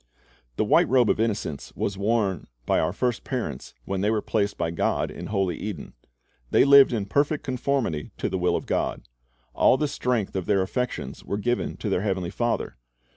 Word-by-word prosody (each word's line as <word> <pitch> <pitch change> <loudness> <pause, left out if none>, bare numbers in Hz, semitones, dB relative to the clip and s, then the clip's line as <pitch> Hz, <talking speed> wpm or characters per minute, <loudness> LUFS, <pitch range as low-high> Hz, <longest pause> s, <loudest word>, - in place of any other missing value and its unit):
The - - +1
white - - +4
robe 125 -2 +4
of - - -1
innocence 105 -10 -2
was 100 - -2
worn 100 -3 0 0.2
by - - +2
our 80 - +1
first 120 +3 -1
parents 125 - -4
when 95 -1 -2
they 105 - +2
were 110 -1 +2
placed 100 -2 0
by 85 - -1
God 85 - 0
in - - -7
holy 95 -4 0
Eden. 100 -8 -6 0.6
They - - +5
lived 140 -1 +8
in 110 -5 -1
perfect 145 +8 +1
conformity 125 - -1
to - - -1
the 95 - -2
will 90 - +2
of - - -3
God. - - -1 0.5
All 130 - +4
the 150 - 0
strength 120 -8 -1
of 95 -2 -2
their 100 -2 +3
affections 125 +6 -3
was 100 +1 -3
given 120 +3 -1
to - - -5
their 90 - +1
Heavenly 95 -4 -1
Father. 120 +2 -2
105 Hz, 190 wpm, -25 LUFS, 95-125 Hz, 0.6 s, lived